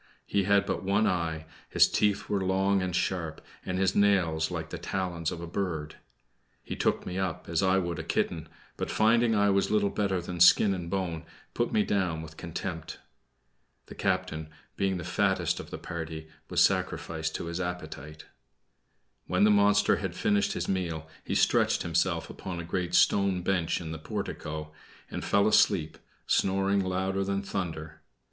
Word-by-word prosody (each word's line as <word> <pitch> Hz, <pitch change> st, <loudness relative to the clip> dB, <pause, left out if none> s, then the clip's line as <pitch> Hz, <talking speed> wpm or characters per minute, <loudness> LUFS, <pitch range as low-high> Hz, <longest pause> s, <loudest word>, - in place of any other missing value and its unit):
He 100 Hz, -2 st, 0 dB
had 100 Hz, 0 st, +4 dB
but 100 Hz, -, -2 dB
one 100 Hz, +3 st, +2 dB
eye, 85 Hz, -5 st, -1 dB, 0.2 s
his -, -, +5 dB
teeth 105 Hz, -2 st, +1 dB
were 100 Hz, -2 st, 0 dB
long 95 Hz, +1 st, +2 dB
and 90 Hz, -1 st, -2 dB
sharp, 90 Hz, -3 st, -1 dB, 0.2 s
and 90 Hz, -, -3 dB
his 95 Hz, 0 st, +2 dB
nails 90 Hz, -6 st, +3 dB
like -, -, -5 dB
the -, -, -5 dB
talons 90 Hz, -4 st, -2 dB
of 85 Hz, -, -6 dB
a -, -, -5 dB
bird. 80 Hz, -4 st, -3 dB, 0.7 s
He -, -, -5 dB
took -, -, 0 dB
me 90 Hz, +1 st, -3 dB
up 95 Hz, -4 st, -3 dB
as 85 Hz, +1 st, 0 dB
I 95 Hz, 0 st, +3 dB
would 85 Hz, -3 st, -2 dB
a -, -, -4 dB
kitten, -, -, -1 dB, 0.3 s
but -, -, -3 dB
finding 115 Hz, +1 st, +3 dB
I 100 Hz, -1 st, +4 dB
was 100 Hz, 0 st, +2 dB
little 105 Hz, -2 st, +2 dB
better 95 Hz, -3 st, 0 dB
than 90 Hz, 0 st, -6 dB
skin 95 Hz, +3 st, +7 dB
and 90 Hz, -3 st, -5 dB
bone, 85 Hz, -4 st, -2 dB, 0.3 s
put 120 Hz, -, 0 dB
me 105 Hz, -, +3 dB
down 90 Hz, -6 st, -1 dB
with 80 Hz, 0 st, -11 dB
contempt. 80 Hz, 0 st, -5 dB, 0.9 s
The -, -, -11 dB
captain, 90 Hz, -5 st, -2 dB, 0.3 s
being 95 Hz, -1 st, 0 dB
the 85 Hz, -, -5 dB
fattest 95 Hz, +3 st, +1 dB
of -, -, -8 dB
the -, -, -6 dB
party, 80 Hz, -1 st, -6 dB, 0.2 s
was -, -, +4 dB
sacrificed 80 Hz, -1 st, 0 dB
to -, -, -4 dB
his 85 Hz, +2 st, -3 dB
appetite. 90 Hz, -3 st, -6 dB, 1.0 s
When 90 Hz, +3 st, +2 dB
the 105 Hz, -, +6 dB
monster 105 Hz, 0 st, +4 dB
had 90 Hz, -1 st, -4 dB
finished 105 Hz, -1 st, +1 dB
his -, -, -3 dB
meal 85 Hz, -5 st, -2 dB, 0.2 s
he -, -, -3 dB
stretched -, -, +3 dB
himself 85 Hz, 0 st, 0 dB
upon 90 Hz, -2 st, -6 dB
a -, -, -4 dB
great 90 Hz, +1 st, -2 dB
stone 95 Hz, 0 st, +3 dB
bench 90 Hz, -3 st, 0 dB
in 80 Hz, -2 st, -6 dB
the 80 Hz, -, -6 dB
portico, 75 Hz, 0 st, -5 dB, 0.4 s
and -, -, -4 dB
fell 100 Hz, +1 st, +3 dB
asleep, 95 Hz, -7 st, +3 dB, 0.3 s
snoring 95 Hz, +1 st, +2 dB
louder 95 Hz, +1 st, -1 dB
than 100 Hz, 0 st, -1 dB
thunder. 80 Hz, -5 st, -5 dB
90 Hz, 175 wpm, -28 LUFS, 85-100 Hz, 1.0 s, skin